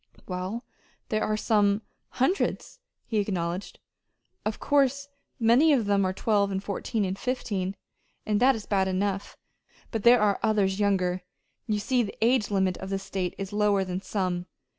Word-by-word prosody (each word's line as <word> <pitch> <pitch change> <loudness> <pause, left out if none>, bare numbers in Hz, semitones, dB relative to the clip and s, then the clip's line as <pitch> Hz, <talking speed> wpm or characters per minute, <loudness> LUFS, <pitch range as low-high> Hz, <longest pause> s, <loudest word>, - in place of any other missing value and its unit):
"Well, 185 +6 -4 0.5
there 215 0 0
are 215 - 0
some 210 -1 +2 0.3
hundreds," 310 +10 0 0.3
he 220 -3 0
acknowledged. 185 -2 -2 0.7
"Of 215 0 -2
course 280 0 +2 0.3
many 250 +7 +5
of 245 -6 +2
them 200 -1 +2
are 185 - +1
twelve 200 +1 +1
and 195 0 -3
fourteen 205 +1 -2
and 190 +1 -3
fifteen, 200 -7 -2 0.5
and 210 -1 +1
that 260 +2 +5
is 220 - -7
bad 195 -2 +1
enough; 195 +1 -2 0.5
but 225 - -2
there 240 +3 +7
are 205 -1 +2
others 205 -3 +1
younger. 185 -3 +1 0.5
You 215 -2 +1
see 245 +4 +1
the 210 - -4
age 230 -1 +3
limit 190 -3 +1
of 190 - -6
this 195 0 -2
state 185 -3 -3
is 195 +1 -5
lower 205 -2 +2
than 185 0 -4
some. 185 -3 -2
205 Hz, 160 wpm, -27 LUFS, 190-225 Hz, 0.7 s, there